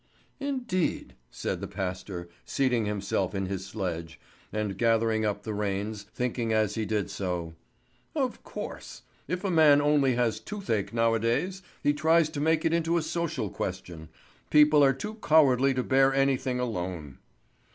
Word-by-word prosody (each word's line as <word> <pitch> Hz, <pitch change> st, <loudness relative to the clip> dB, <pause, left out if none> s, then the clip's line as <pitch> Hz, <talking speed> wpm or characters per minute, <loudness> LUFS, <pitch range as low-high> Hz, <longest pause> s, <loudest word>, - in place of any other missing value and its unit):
"Indeed?" 250 Hz, -, -2 dB, 0.2 s
said -, -, -4 dB
the -, -, -4 dB
pastor, 90 Hz, -2 st, -5 dB, 0.2 s
seating 125 Hz, -5 st, +1 dB
himself 100 Hz, -2 st, -1 dB
in 95 Hz, 0 st, -1 dB
his 95 Hz, 0 st, -4 dB
sledge, 85 Hz, -5 st, -4 dB, 0.3 s
and 105 Hz, -2 st, -2 dB
gathering 115 Hz, 0 st, +2 dB
up 105 Hz, -1 st, -2 dB
the 110 Hz, -, -4 dB
reins, 105 Hz, 0 st, -3 dB
thinking 120 Hz, -2 st, -1 dB
as 110 Hz, -2 st, +2 dB
he 110 Hz, -1 st, -2 dB
did 105 Hz, -3 st, -1 dB
so: 90 Hz, -4 st, -3 dB, 0.6 s
"Of -, -, -1 dB
course! -, -, -8 dB, 0.2 s
If 180 Hz, +4 st, -3 dB
a 195 Hz, -, 0 dB
man 155 Hz, -4 st, +6 dB
only 145 Hz, -3 st, +3 dB
has 115 Hz, -3 st, +1 dB
toothache 195 Hz, -, -3 dB
nowadays, 115 Hz, -, +1 dB, 0.2 s
he 145 Hz, -, +3 dB
tries 160 Hz, +1 st, +3 dB
to 145 Hz, -2 st, -4 dB
make 160 Hz, +2 st, +2 dB
it 165 Hz, -, +2 dB
into 170 Hz, 0 st, +1 dB
a 165 Hz, -, 0 dB
social 160 Hz, -, -2 dB
question. 90 Hz, -4 st, -5 dB, 0.4 s
People 150 Hz, -1 st, +6 dB
are 135 Hz, -, +6 dB
too 210 Hz, -, -7 dB
cowardly 140 Hz, -4 st, +5 dB
to 125 Hz, -, 0 dB
bear 135 Hz, +1 st, +4 dB
anything 135 Hz, -2 st, +1 dB
alone." 90 Hz, -, -4 dB
115 Hz, 150 wpm, -28 LUFS, 100-150 Hz, 0.6 s, man